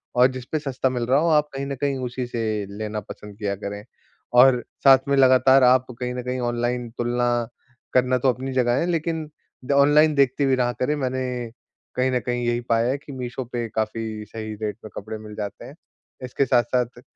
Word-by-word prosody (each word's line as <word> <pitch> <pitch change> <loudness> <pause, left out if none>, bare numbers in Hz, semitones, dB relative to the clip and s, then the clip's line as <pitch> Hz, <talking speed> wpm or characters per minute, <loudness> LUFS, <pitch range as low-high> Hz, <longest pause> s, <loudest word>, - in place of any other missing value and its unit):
और 125 +1 +6
जिस 130 -1 -7
पे 155 - 0
सस्ता 135 -3 -1
मिल 125 -2 -2
रहा 135 +3 +4
हो, 165 +2 +2
आप 150 -1 +3
कहीं 135 0 -4
न 140 - -3
कहीं 140 -1 0
उसी 125 +1 -4
से 120 -1 -4 0.4
लेना 110 0 -3
पसंद 105 0 -11
किया 100 -2 -2
करें। 100 +1 -6 0.6
और 125 -1 +6 0.2
साथ 135 -1 +8
में 140 - +3
लगातार 130 0 +6
आप 125 +1 +5
कहीं 125 -1 -3
न 125 - -3
कहीं 125 +1 -3
ऑनलाइन 120 0 -1
तुलना 120 0 0 0.7
करना 125 0 +3
तो 130 +1 +2
अपनी 130 +2 -2
जगह 125 -2 +2
है, - - 0
लेकिन 160 -1 -2 0.4
द - - -2
ऑनलाइन 145 +2 +5
देखतीं 140 0 +2
भी 135 - +3
रहा 125 -1 +1
करें, 145 +4 +1
मैंने 130 -3 -3 0.4
कहीं 130 +1 +1
न 125 - +1
कहीं 120 0 -1
यही 120 0 0
पाया 115 +1 +2
है 135 - -1
कि 145 +1 -12
मीशो 125 0 -5
पे 120 -1 -2
काफ़ी 110 0 -3
सही 110 0 -7
रेट 105 -1 -3
पे 110 - -8
कपड़े 110 +2 -6
मिल 105 0 -10
जाते 105 -1 -6
हैं। - - -11 0.5
इसके 125 +2 0
साथ-साथ 120 0 0
125 Hz, 205 wpm, -23 LUFS, 120-135 Hz, 0.7 s, साथ